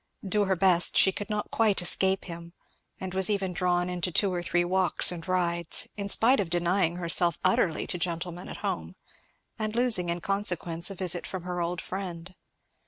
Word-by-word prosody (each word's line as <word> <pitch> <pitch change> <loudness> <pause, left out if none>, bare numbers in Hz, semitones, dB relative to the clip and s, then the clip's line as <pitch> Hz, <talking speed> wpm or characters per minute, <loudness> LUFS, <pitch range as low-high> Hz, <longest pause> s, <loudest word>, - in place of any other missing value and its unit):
Do 205 +2 +1
her 190 -1 +1
best 175 -1 +2
she 190 - +6
could 205 +2 -7
not 210 -1 -3
quite 220 -3 +2
escape 190 +2 +1
him, 170 -1 -9 0.5
and 185 -1 -6
was 190 +1 0
even 195 -3 -1
drawn 175 0 0
into 180 0 -2
two 195 +2 +3
or 175 - -2
three 175 0 0
walks 185 0 +3
and 175 0 -7
rides; 170 -2 +1
in 200 -1 -4
spite 245 +6 +5
of 190 - -1
denying 175 0 +1
herself 170 -1 +1
utterly 185 -3 +1
to 180 - -1
gentlemen 175 0 -4
at - - -7
home, 80 +2 -4 0.6
and 215 0 -3
losing 235 -8 +2
in 170 0 -1
consequence 180 -3 0
a 195 - -7
visit 180 -2 -1
from 185 -2 -6
her 180 -1 -4
old 170 +1 -2
friend. 185 -2 -6
180 Hz, 185 wpm, -27 LUFS, 170-195 Hz, 0.6 s, she